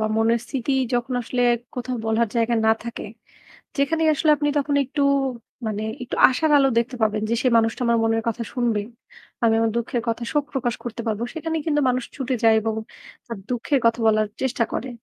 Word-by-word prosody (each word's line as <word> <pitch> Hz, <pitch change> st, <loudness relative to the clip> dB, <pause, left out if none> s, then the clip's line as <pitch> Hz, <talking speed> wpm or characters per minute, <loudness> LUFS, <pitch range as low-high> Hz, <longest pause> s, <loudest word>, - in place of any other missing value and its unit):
বা 220 Hz, -, +1 dB
মনের 230 Hz, +1 st, +2 dB
স্থিতি 270 Hz, +1 st, -2 dB, 0.2 s
যখন 245 Hz, +1 st, -1 dB
আসলে 245 Hz, +2 st, -1 dB, 0.3 s
কোথাও 250 Hz, 0 st, -3 dB
বলার 220 Hz, 0 st, +1 dB
জায়গা 235 Hz, +1 st, +2 dB
না 220 Hz, -, +6 dB
থাকে, 235 Hz, 0 st, -6 dB, 0.7 s
যেখানে 320 Hz, +4 st, +1 dB
আসলে 305 Hz, +1 st, +2 dB
আপনি 295 Hz, 0 st, 0 dB
তখন 285 Hz, 0 st, 0 dB
একটু 280 Hz, +2 st, -2 dB, 0.6 s
মানে 215 Hz, 0 st, -2 dB, 0.2 s
একটু 245 Hz, -, -5 dB
আশার 305 Hz, +5 st, 0 dB
আলো 270 Hz, -1 st, +4 dB
দেখতে 250 Hz, +2 st, -1 dB
পাবেন 215 Hz, -1 st, +1 dB
যে -, -, +2 dB
সে 255 Hz, -, +3 dB
মানুষটা 225 Hz, +2 st, +1 dB
আমার 235 Hz, 0 st, +3 dB
মনের 225 Hz, 0 st, +1 dB
কথা 230 Hz, +1 st, -2 dB
শুনবে, 235 Hz, -4 st, 0 dB, 0.6 s
আমি 225 Hz, -1 st, +4 dB
আমার 225 Hz, -1 st, +2 dB
দুঃখের 235 Hz, 0 st, -1 dB
কথা 230 Hz, +1 st, -1 dB
শোক 295 Hz, -1 st, +1 dB
প্রকাশ 245 Hz, -3 st, -1 dB
করতে 235 Hz, 0 st, -5 dB
পারবো, 215 Hz, +1 st, -2 dB
সেখানেই 320 Hz, -1 st, -3 dB
কিন্তু 295 Hz, -1 st, +2 dB
মানুষ 250 Hz, 0 st, 0 dB
ছুটে 265 Hz, -1 st, -2 dB
যায় 225 Hz, -, +6 dB
এবং 220 Hz, 0 st, -2 dB, 0.5 s
তার 230 Hz, -4 st, -6 dB
দুঃখের 250 Hz, +3 st, 0 dB
কথা 230 Hz, +1 st, +2 dB
বলার 215 Hz, -1 st, +3 dB, 0.2 s
চেষ্টা 250 Hz, -2 st, +1 dB
করে। 260 Hz, -, -3 dB
240 Hz, 190 wpm, -23 LUFS, 225-270 Hz, 0.7 s, না